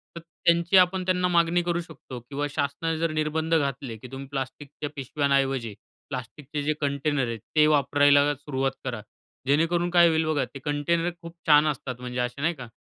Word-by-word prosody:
तर - - -5
त्यांची 170 +2 +2
आपण 185 +1 +4
त्यांना 180 -1 +2
मागणी 170 0 +3
करू 170 0 0
शकतो 140 -6 -10
किंवा 140 +4 -4
शासनाने 145 +3 -2
जर 165 0 0
निर्बंध 155 +1 -1
घातले, 135 -5 -1
की 125 - -11
तुम्ही 135 +1 -7
प्लास्टिकच्या 140 +2 -5
पिशव्यांऐवजी 135 -3 0 0.4
प्लास्टिकचे 140 +3 -5
जे 155 - +1
कंटेनर 140 -1 0
आहेत, 115 -1 -4 0.2
ते 150 0 +6
वापरायला 145 0 +4
सुरुवात 135 -1 -2
करा. 120 -4 -3 0.5
जेणेकरून 165 +4 +2
काय 175 -1 +6
होईल 160 -1 +2
बघा, 155 -2 +1
ते 140 - -11
कंटेनर 150 +4 0
खूप 170 0 -10
छान 150 0 +6
असतात, 130 -3 -3
म्हणजे 125 0 -5
असे 125 +3 -2
नाही 165 +3 +1
का, 125 -4 -9
145 Hz, 175 wpm, -26 LUFS, 135-165 Hz, 0.5 s, ते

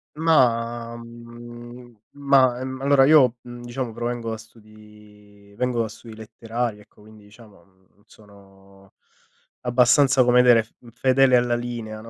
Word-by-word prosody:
Ma, 120 -7 0
mhmm 120 +1 -13 0.2
ma, 135 -3 +2
mhmm, 130 0 -7
allora 140 0 +3
io 135 -5 +4
diciamo 120 0 -7
provengo 120 0 -5
da 110 - -5
studi 105 -2 -19
vengo 125 -1 -1
da 115 - -2
studi 110 +1 -13
letterari, 110 +1 -6
ecco, 105 - -22
quindi 110 0 -18
diciamo 105 0 -19
mhmm 95 -1 -33
non 100 - -30
sono 95 -2 -21 0.7
abbastanza, 130 +2 +3
come 125 0 +4
dire, 115 -3 +4 0.3
fedele 130 +1 +3
alla 120 0 0
linea, 120 -3 -7
no, 115 - -13
120 Hz, 135 wpm, -22 LUFS, 110-125 Hz, 0.7 s, io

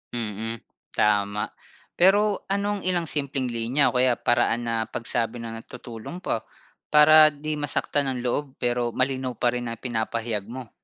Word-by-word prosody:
Mm. 115 0 -4 0.3
Tama. 105 0 +1 0.5
Pero 205 +3 +3
anong 200 -1 -1
ilang 175 -3 0
simpleng 140 -3 -1
linya 120 +5 +2
o - - -1
kaya 125 -1 +3
paraan 120 0 +1
na 115 - 0
pagsabi 115 0 -2
na 115 -1 -6
tutulong 125 +7 -9
pa, 110 - -2 0.4
para 155 +1 +8
'di 150 +1 -4
masaktan 145 0 0
ang 130 -2 -2
loob, 135 +2 -2
pero 120 -1 -1
malinaw 130 -1 -1
pa 120 - +1
rin 120 0 -3
na 115 - -4
ipinapahayag 115 -3 -2
mo? 125 0 -8
125 Hz, 150 wpm, -25 LUFS, 115-145 Hz, 0.5 s, para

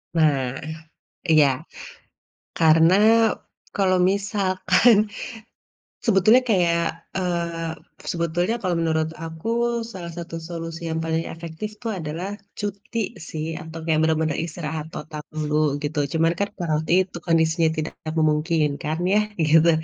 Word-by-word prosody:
Nah, 135 -5 +2 0.7
iya. 155 -3 +6 1.1
Karena 165 +2 +6 0.8
kalau 185 -2 +3
misalkan 200 +1 +3 1.1
sebetulnya 220 +4 +5
kayak 170 -4 +3 0.4
eee, 170 -2 -2 0.4
sebetulnya 175 +5 0
kalau 180 -3 0
menurut 160 -1 +1
aku 160 +3 -7 0.4
salah 170 -4 -7
satu 170 -1 -6
solusi 165 -1 -6
yang 160 - -1
paling 160 0 0
efektif 165 +5 -6
tuh 230 - -3
adalah 165 +4 -4 0.3
cuti 205 +3 -4 0.3
sih 155 -1 -4 0.2
atau 160 +1 -9
kayak 160 -2 +2
bener-bener 160 -1 +1
istirahat 155 -2 -5
total 155 -1 -6 0.2
dulu 150 -1 -1 0.3
gitu 150 +1 -2
cuman 165 +1 +3
kan 200 0 0
berarti 160 -2 -1
itu 185 -2 -10
kondisinya 165 -1 +3
tidak 155 +1 -3 0.3
memungkinkan 155 0 +1 0.2
ya, 210 - +5 0.3
gitu. 160 +2 +6
165 Hz, 115 wpm, -23 LUFS, 160-180 Hz, 1.1 s, iya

